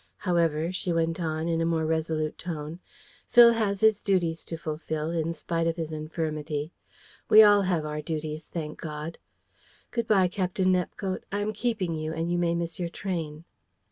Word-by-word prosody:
However," 170 -3 +1
she 185 -1 -2
went 165 0 0
on, 160 -1 -2
in 165 -1 +1
a - - +2
more 165 -1 +1
resolute 155 -1 -1
tone, 160 -1 -5 0.5
"Phil 235 -1 +8
has 205 -4 0
his 220 -1 +4
duties 170 -5 +1
to 165 - -5
fulfil, 155 0 -3
in 165 -1 -1
spite 165 0 -2
of 165 - 0
his 160 -2 -4
infirmity. 155 -1 -3 0.6
We 215 +1 +10
all 205 -1 +6
have 180 -5 0
our 150 0 -3
duties, 155 0 -4
thank 155 -3 -6
God. 155 +1 -6 0.7
Good 235 -2 -1
bye, 195 -4 +4
Captain 185 0 0
Nepcote. 185 +1 -2
I 205 +1 -1
am 215 +1 -1
keeping 220 -8 -1
you, 155 0 -3
and 165 +1 -2
you 175 - +1
may 170 -1 +1
miss 170 +2 -3
your 175 -1 -2
train." 165 -5 -4
165 Hz, 175 wpm, -27 LUFS, 155-185 Hz, 0.7 s, We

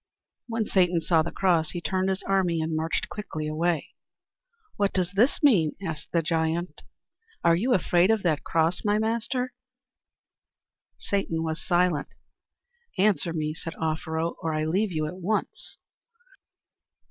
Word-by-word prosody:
When 225 -2 -1
Satan 180 -4 +3
saw 165 0 +3
the 165 - -2
cross, 170 -5 +2
he 175 - -3
turned 185 +2 0
his 190 0 -2
army 185 -4 +1
and 160 0 -1
marched 160 +1 -1
quickly 160 -7 -5
away. 160 +1 0 0.9
"What 200 -1 +1
does 180 -2 0
this 225 +10 +2
mean?" 185 - +5
asked 155 -3 -5
the 170 -1 +1
giant. 165 +2 -1 0.6
"Are 170 - +5
you 245 +8 +2
afraid 180 0 +3
of 220 -2 +2
that 160 -5 +1
cross, 165 +2 +1
my 210 0 +2
master?" 235 +3 -1 1.4
Satan 165 -5 -1
was 160 0 -3
silent. 175 -4 +2 0.9
"Answer 195 -3 +2
me," 155 -2 -2
said 165 +1 -7
Offero, 160 +1 -2
"or 160 -1 -1
I 155 0 0
leave 190 +6 +1
you 155 -2 -1
at 170 +4 -5
once." 195 +4 -3
175 Hz, 145 wpm, -26 LUFS, 160-195 Hz, 1.4 s, mean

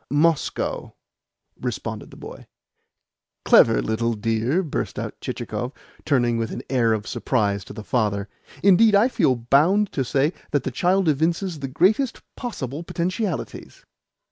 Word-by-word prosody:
"Moscow," 145 -1 0 0.7
responded - - -4
the - - -14
boy. - - -10 1.0
"Clever - - +5
little 115 - 0
dear!" 115 - 0
burst 155 - -4
out - - -6
Chichikov, 125 +3 -4 0.3
turning 120 -5 +2
with 115 - -2
an - - -6
air 120 -4 +3
of 105 -1 -3
surprise 100 -6 -1
to - - -11
the 110 - -8
father. 105 -4 0 0.4
"Indeed, 200 +2 +6
I 205 +4 +5
feel 160 - +2
bound 155 - +3
to 135 - -1
say 140 +6 +1 0.2
that 145 -3 0
the 130 - -3
child 180 +7 +1
evinces 165 +3 0
the 135 - -4
greatest 210 - +1
possible 150 - -5
potentialities." 180 +2 -4
140 Hz, 140 wpm, -23 LUFS, 115-180 Hz, 1.0 s, Indeed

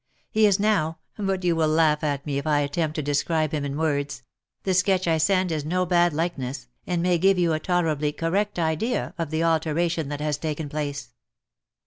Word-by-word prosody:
He 215 0 +4
is 200 -1 +2
now 195 -7 +1
— - - -51
but 195 -3 -2
you 175 -2 +2
will 160 -1 +2
laugh 155 -1 +3
at 140 -2 -1
me 140 -2 -1
if 140 - -6
I 145 -1 +3
attempt 155 +2 -1
to 155 - -2
describe 150 +2 0
him 150 -2 -2
in 140 0 -3
words 145 -4 -1 0.2
— - - -56
the 190 - +1
sketch 185 0 +2
I 160 -1 +2
send 185 +2 +2
is 155 -2 -1
no 180 +4 0
bad 175 -1 +3
like 165 +1 -2
ness, 130 0 -5 0.2
and 175 -2 0
may 180 -1 +2
give 195 +2 +4
you 170 -2 +2
a 155 - 0
tolerably 155 -4 0
correct 190 +7 -1
idea 170 +9 -1
of 165 -3 -2
the 160 +1 -1
alteration 165 -1 0
that 145 -1 -4
has 150 -1 -1
taken 155 -1 -3
place. 145 -1 -4
160 Hz, 215 wpm, -25 LUFS, 150-180 Hz, 0.2 s, He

